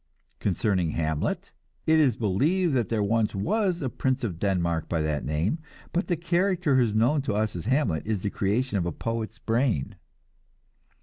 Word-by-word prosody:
Concerning 95 -2 +1
Hamlet, 80 -2 -1 0.3
it 160 0 +4
is 135 -7 +4
believed 150 - +1
there 115 -4 +1
was 110 +1 +1
once 185 - 0
a - - 0
Prince 130 +1 -1
of 90 -8 -3
Denmark 85 -4 0
by 85 - 0
that 75 -2 -1
name, 80 - 0 0.3
but 180 +4 0
the 175 - 0
character 175 -2 +1
who 130 - +5
is 110 -3 +1
known 125 +7 +3
to 115 -6 -2
us 110 -1 0
as 85 - -5
Hamlet 120 - +1
is 105 -4 -1
the 100 - -1
creation 105 +2 0
of 85 - -1
a - - -1
poet's 115 +4 -4
brain. 115 - 0
110 Hz, 175 wpm, -26 LUFS, 95-140 Hz, 0.3 s, who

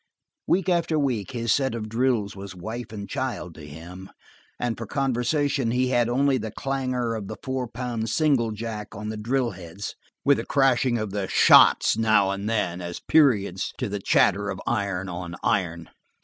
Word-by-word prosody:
Week 190 0 +2
after 170 -3 +1
week 130 -8 -1
his 115 -4 0
set 135 -4 0
of 110 -2 -4
drills 115 -3 0
was 95 -1 -8
wife 110 +6 -6
and 100 -2 -6
child 130 -10 -4
to 75 -2 -11
him, 85 +5 -10 0.5
and 120 -2 -1
for 115 - -7
conversation 135 0 0
he 125 +2 +1
had 120 -2 +2
only 135 +1 +2
the 110 0 -4
clangor 130 -1 -2
of 105 -3 -5
the 110 - -6
four 130 -2 -2
pound 115 -1 -4
single 135 -5 +2
jack 110 -1 -6
on 105 +1 -5
the 110 - -4
drill 120 +3 0
heads, 90 +1 -7 0.3
with 140 0 +5
the - - -3
crashing 130 -3 +3
of 110 -3 -3
the 100 -1 -2
"shots" - - +6
now 110 -3 +3
and 100 +2 -3
then 90 -6 -1
as 85 0 -5
periods 115 -11 +2
to 125 - -2
the 100 0 -3
chatter 100 +1 +3
of 95 - -4
iron 100 -5 -1
on 85 -1 -6
iron. 85 -3 0
115 Hz, 180 wpm, -25 LUFS, 100-130 Hz, 0.5 s, shots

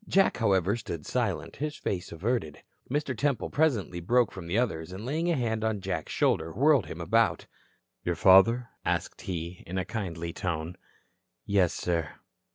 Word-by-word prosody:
Jack, 195 0 +3
however, 100 -3 +2
stood 95 -10 -6
silent, - - -2
his 150 +1 -3
face 90 -3 -3
averted. 85 - -2 0.3
Mr. 140 -1 -1
Temple 140 +2 0
presently 120 - +1
broke 120 +6 +2
from 90 -3 -8
the 90 +5 0
others 90 -9 -1
and 95 +4 -7
laying 160 +6 0
a 170 - +3
hand 110 -4 -1
on 110 -2 0
Jack's 90 -4 -3
shoulder 80 - +1
whirled 140 - +3
him 80 - -7
about. 110 +7 +2 0.7
"Father?" 110 +8 +6
asked - - -2
he, 85 -1 -5
in 90 +2 -4
a 95 - -1
kindly 85 -6 -4
tone. 85 -1 -3 0.7
"Yes, 95 -4 +2
sir." 85 -3 -1
100 Hz, 160 wpm, -28 LUFS, 85-120 Hz, 0.7 s, Father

